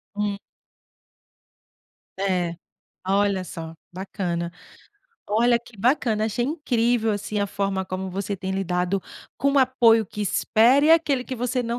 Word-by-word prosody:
Hum. 205 -1 -1 1.8
É. 180 -3 0 0.5
Olha 200 -1 +2
só. 165 -2 -7 0.2
Bacana. 175 -2 -3 0.8
Olha 235 +3 +3
que 235 -1 -17
bacana, 220 -1 +1
achei 235 +3 -1
incrível, 245 -6 +1
assim, 210 +1 -3
a 200 - +1
forma 195 -1 -2
como 185 +1 -4
você 195 +1 -3
tem 190 +1 -5
lidado 180 0 -1 0.4
com 280 +2 +1
o 280 - +4
apoio 235 -4 +4
que 210 - -8
espere, 235 +7 +3
e - - +5
aquele 300 -6 +3
que 260 - -5
você 250 +1 -1
não 235 +1 -2
210 Hz, 140 wpm, -24 LUFS, 190-245 Hz, 1.8 s, e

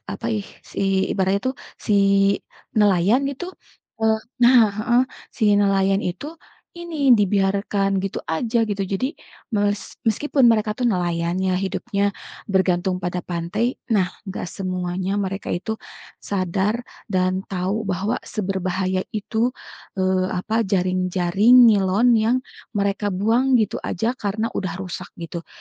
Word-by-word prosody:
apa 230 - -5
ih, 205 -2 -3 0.3
si - - -4 0.3
ibaratnya 190 +1 +1
tuh, - - -7 0.3
si 215 - +2 0.9
nelayan 205 +4 +4
itu, 280 +6 -6 0.5
eee 220 0 +3 0.2
nah, 245 +1 +7 0.2
heeh, 240 +3 +3 0.4
si 225 - +2 0.2
nelayan 195 0 +2
itu 180 +10 -4 0.5
ini, 310 -7 +3
dibiarkan 195 0 +1
gitu 195 - -3
aja, 225 +9 0
gitu. 200 -1 -1
Jadi 195 +6 -1 0.5
mes 205 -1 +1 0.3
meskipun 275 +5 +1
mereka 215 -1 +2
tuh - - -2
nelayan 175 -2 -1
ya, 190 -1 +1
hidupnya 200 +2 -1 0.4
bergantung 185 -1 +1
pada 180 0 -3
pantai, 175 +5 -2 0.3
nah 185 -3 +2 0.2
nggak 190 - -5
semuanya 185 0 -3
mereka 195 -1 -3
itu 220 +5 -4 0.4
sadar 200 +4 -1 0.2
dan 185 -1 0
tahu 195 +3 -2
bahwa 200 +7 -1
seberbahaya 190 -2 -1
itu, 225 +4 -1 0.4
eee, 185 0 +2
apa, 215 +4 -3
jaring-jaring 185 +3 +2
nilon 205 +3 +3
yang 225 +4 +2 0.4
mereka 200 0 0
buang 230 +7 +2
gitu 215 - -1
aja 220 +6 -1
karena 215 +3 -2
udah 185 -3 -3
rusak, 185 0 -6 0.2
gitu. 170 0 -6
195 Hz, 125 wpm, -22 LUFS, 185-220 Hz, 0.9 s, nah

